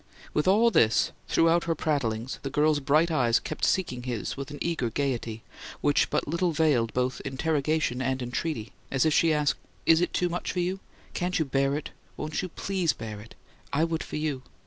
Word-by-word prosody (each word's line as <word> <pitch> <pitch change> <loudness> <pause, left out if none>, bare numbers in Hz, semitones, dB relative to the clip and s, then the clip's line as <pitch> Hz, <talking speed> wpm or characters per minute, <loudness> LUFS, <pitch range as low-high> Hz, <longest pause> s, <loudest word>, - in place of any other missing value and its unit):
With 150 +3 +1
all 220 +5 +5
this, 110 - +3 0.2
throughout 165 +1 +3
her 165 -1 0
prattlings, 130 -6 -1
the 135 - -4
girl's 150 +1 +2
bright 155 +4 +3
eyes 120 -6 +3
kept - - -6
seeking 160 -10 +1
his 120 -3 -3
with 140 +1 -6
an 145 - -7
eager 165 -8 -1
gayety, 115 -3 -2 0.4
which 145 0 +2
but - - 0
little 170 +3 +1
veiled 145 -8 +2
both 125 +1 -1
interrogation 145 -1 0
and 130 0 0
entreaty 125 -1 -3 0.2
as 135 0 +1
if 155 - +3
she 165 +1 +4
asked: 150 -1 +1 0.3
"Is 165 +1 +5
it 175 - +1
too 180 - +1
much 175 0 -3
for 180 - -1
you? 180 +2 -1 0.3
Can't 180 0 -1
you 160 - +1
bear 135 0 +1
it? 150 - -5 0.3
Won't 155 0 -2
you 185 - -4
PLEASE 185 -2 0
bear 110 -2 -7
it? 115 - -14 0.4
I 150 +3 +2
would 165 -1 -1
for - - -7
you. 150 -4 -2
150 Hz, 195 wpm, -27 LUFS, 130-165 Hz, 0.4 s, all